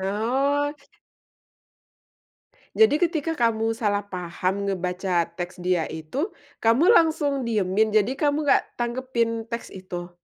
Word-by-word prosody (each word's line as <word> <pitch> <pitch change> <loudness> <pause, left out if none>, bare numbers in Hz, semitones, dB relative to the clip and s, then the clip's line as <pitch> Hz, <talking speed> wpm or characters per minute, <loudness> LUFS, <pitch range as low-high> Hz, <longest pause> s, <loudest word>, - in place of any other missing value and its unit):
Oh. 265 +9 0 2.0
Jadi 435 -9 +5
ketika 325 -2 -1
kamu 225 -2 +1
salah 210 -3 0
paham 185 +1 -3
ngebaca 180 -2 -1
teks 175 0 -5
dia 180 -3 +1
itu, 160 - -4 0.2
kamu 245 - +4
langsung 305 - +3
diemin, 215 0 +1
jadi 220 +6 +2
kamu 295 +1 +1
nggak 290 - +4
tanggepin 235 -2 -2
teks 235 0 -6
itu? 180 -2 -7
225 Hz, 110 wpm, -24 LUFS, 185-275 Hz, 2.0 s, Jadi